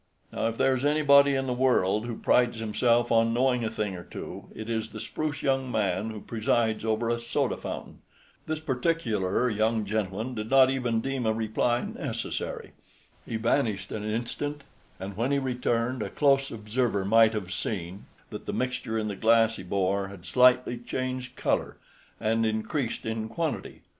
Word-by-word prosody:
Now - - 0
if 115 0 -3
there 135 - +3
is 130 - -3
anybody 140 -1 +5
in 135 0 0
the 125 - -1
world 120 -4 +2
who 115 - -4
prides 120 -2 +3
himself 115 +2 +1
on 115 0 +3
knowing 125 -1 +2
a 110 - 0
thing 105 -3 -3
or 90 - -8
two, - - -8
it 110 - -7
is 115 -1 -2
the 110 - -8
spruce 150 +6 -4
young 135 -2 +1
man 105 -1 0
who 110 -2 -7
presides 110 0 0
over 110 +1 0
a 120 0 0
soda 115 - -1
fountain. - - -7 0.5
This 155 0 -2
particular 125 - 0
young 110 0 +1
gentleman 105 +3 -2
did 110 -1 -5
not 130 -1 +6
even 120 -4 0
deem 135 -3 -2
a 110 - +3
reply 115 +2 0
necessary. - - -4 0.6
He - - -3
vanished 110 -4 0
an 105 - -4
instant, 120 +7 -3 0.4
and 95 +1 -6
when 120 +6 0
he 140 - +3
returned 125 -2 -1
a - - -3
close 135 -2 +3
observer 105 -2 -1
might 110 +2 +5
have 95 -3 -4
seen 95 -1 -4 0.2
that - - -8
the - - -2
mixture 125 -3 -2
in 110 -1 -1
the 100 - -3
glass 115 +1 +3
he - - -7
bore 100 +1 0
had 95 -3 -11
slightly 125 -1 +4
changed 130 +1 -4
color - - -1 0.4
and 115 +1 +1
increased 110 +4 -2
in 110 0 -3
quantity. 160 +5 -3
115 Hz, 175 wpm, -27 LUFS, 110-130 Hz, 0.6 s, not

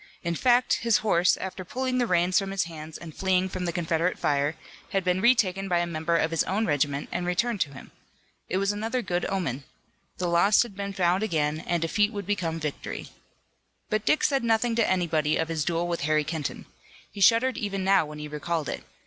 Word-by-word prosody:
In 170 -1 -1
fact 245 +7 +3
his 230 -2 +3
horse, 180 -3 +3
after 190 0 -6
pulling 255 +6 -2
the 245 - +1
reins 180 0 +3
from 195 -1 -4
his 195 0 0
hands 160 -2 -8
and 165 -3 -10
fleeing 190 -1 +1
from 185 -1 -4
the 170 - -1
Confederate 170 +1 0
fire, 145 +2 0 0.4
had 195 -1 +1
been 180 +1 +1
retaken 195 -5 +2
by 175 - +2
a 175 - +1
member 170 0 0
of 160 - +1
his 165 - +2
own 210 +4 0
regiment 145 -2 0
and 180 - -2
returned 205 +4 0
to 140 - 0
him. - - -12 0.6
It 185 - 0
was 195 +1 +1
another 225 +4 -2
good 175 -3 -1
omen. 165 -9 -2 0.5
The 180 - -2
lost 175 +6 +4
had 230 -5 -11
been 200 0 -4
found 180 0 +2
again 155 -7 0
and 170 0 -1
defeat 205 +6 +2
would 205 -2 -5
become 175 -5 -1
victory. 150 -2 -5 0.8
But 215 0 +1
Dick 305 +8 +2
said 275 -3 +2
nothing 230 +1 +2
to 230 - +3
anybody 160 -5 +1
of 160 0 -1
his 160 -2 -1
duel 170 +2 -1
with 170 -1 -2
Harry 155 +1 +2
Kenton. 160 -2 -4 0.5
He 200 - -8
shuddered 230 +3 +4
even 195 -2 -2
now 190 -4 +3
when 150 0 -9
he 150 0 -6
recalled 150 +1 -3
it. - - -5
180 Hz, 210 wpm, -26 LUFS, 160-205 Hz, 0.8 s, lost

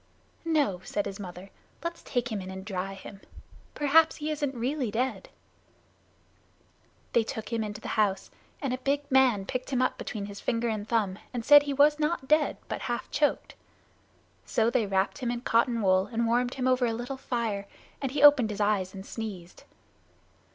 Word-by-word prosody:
"No," 290 - +1
said 205 - -2
his 195 - -6
mother, 185 0 -9 0.3
"let's 335 0 -4
take 245 -1 -2
him 210 -3 -2
in 185 - -7
and 190 0 -7
dry 195 -1 -4
him. 195 0 -11 0.5
Perhaps 310 +2 +4
he 305 0 -3
isn't 290 -3 -2
really 260 0 -1
dead." 255 - -2 1.8
They 235 - +4
took 220 -1 -6
him 225 -1 0
into 210 0 -6
the - - -6
house, 205 -3 0 0.3
and 265 -2 0
a 255 - -3
big 280 +2 0
man 255 -7 +4
picked 255 +4 -4
him 260 -3 0
up 255 - 0
between 205 -3 -5
his 200 0 -8
finger 235 0 -1
and 215 -1 -4
thumb 205 -5 0 0.2
and 230 -2 -3
said 290 0 +9
he 285 0 -3
was 295 +2 +4
not 300 -3 -1
dead 305 +1 +3
but - - -4
half 240 - -3
choked. 295 0 0 0.9
So 225 +1 +1
they 240 -5 +1
wrapped 195 0 0
him 245 - -2
in 240 0 -2
cotton 235 -1 +2
wool, 185 0 +3
and 230 0 0
warmed 245 +2 +1
him 260 -1 -1
over 255 -1 +3
a 230 - -1
little 245 +4 -4
fire, 225 -6 -3 0.3
and 270 -2 -2
he 285 +1 0
opened 285 -6 +7
his 210 -1 -5
eyes 205 -2 0
and 190 0 -8
sneezed. 200 -7 -7
235 Hz, 185 wpm, -28 LUFS, 205-270 Hz, 1.8 s, said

